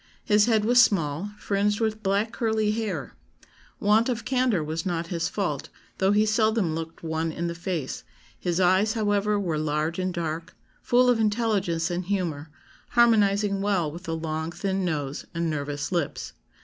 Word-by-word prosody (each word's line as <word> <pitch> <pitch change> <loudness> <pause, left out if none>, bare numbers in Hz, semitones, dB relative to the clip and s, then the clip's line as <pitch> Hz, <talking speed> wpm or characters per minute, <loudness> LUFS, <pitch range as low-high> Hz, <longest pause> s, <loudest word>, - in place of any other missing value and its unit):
His 210 +1 +4
head 220 -3 +3
was 245 +2 +6
small, 170 -3 +1
fringed 205 0 0
with 220 -1 -1
black 200 +3 0
curly 220 -3 0
hair. 210 -10 -3 0.7
Want 215 +4 +3
of 235 -2 -2
candour 250 -9 +1
was 160 +2 -3
not 170 -2 -2
his 170 -1 -1
fault, 175 -9 -3 0.3
though 190 +1 +3
he 210 +1 +4
seldom 215 -4 +2
looked 165 +1 -6
one 160 0 -1
in 170 +2 -4
the 170 - -2
face; 170 -5 -4 0.4
his 175 0 -1
eyes, 190 +4 +3
however, 205 -1 +1
were 170 -6 -1
large 155 +3 -1
and 185 0 -1
dark, 165 0 -4 0.3
full 250 +1 +3
of 245 -2 +3
intelligence 205 -6 0
and 175 +1 -2
humour, 170 -6 -2 0.4
harmonising 205 -4 +3
well 190 -6 +1
with 175 +4 -9
the 165 - -2
long 160 0 -3
thin 190 +1 -2
nose 145 -5 -3
and 170 -1 0
nervous 145 0 -3
lips. 170 -6 -2
190 Hz, 165 wpm, -26 LUFS, 165-210 Hz, 0.7 s, was